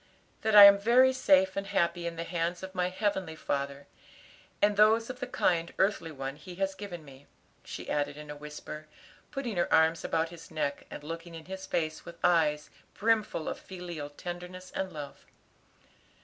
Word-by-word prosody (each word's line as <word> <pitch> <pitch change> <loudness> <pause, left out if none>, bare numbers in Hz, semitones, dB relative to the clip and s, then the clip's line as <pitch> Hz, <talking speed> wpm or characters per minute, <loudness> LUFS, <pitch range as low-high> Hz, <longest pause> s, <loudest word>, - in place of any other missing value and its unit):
That 220 -1 +1
I 205 - +13
am 200 0 +10
very 250 +5 +5
safe 190 -7 +4
and 195 0 -3
happy 170 -3 0
in 170 - -4
the 165 - -4
hands 170 +1 -2
of 190 0 -7
my 180 -1 0
heavenly 185 -4 -2
Father 140 -2 -3 0.7
and 205 0 +3
those 220 +3 +4
of 255 - -12
the 255 - -4
kind 170 -8 +1
earthly 190 -4 +1
one 135 -1 -5
He 175 +4 -10
has 195 +1 -1
given 185 -5 -8
me," 140 0 -15 0.4
she - - -8
added 145 0 -1
in 150 0 -8
a - - -7
whisper, 150 +1 -9 0.4
putting 255 -8 -4
her 175 - +1
arms 160 +1 +4
about 160 0 0
his 165 -1 -12
neck, 150 -3 -3
and 145 - -8
looking 165 +2 -7
in 160 -1 -9
his 190 +1 -7
face 155 -1 -2
with 170 0 -11
eyes 155 -4 +2 0.2
brimful 215 -6 +1
of - - -3
filial 175 -5 -7
tenderness 180 +4 -8
and 190 -1 -3
love. 145 -2 -8
175 Hz, 180 wpm, -30 LUFS, 155-195 Hz, 0.7 s, I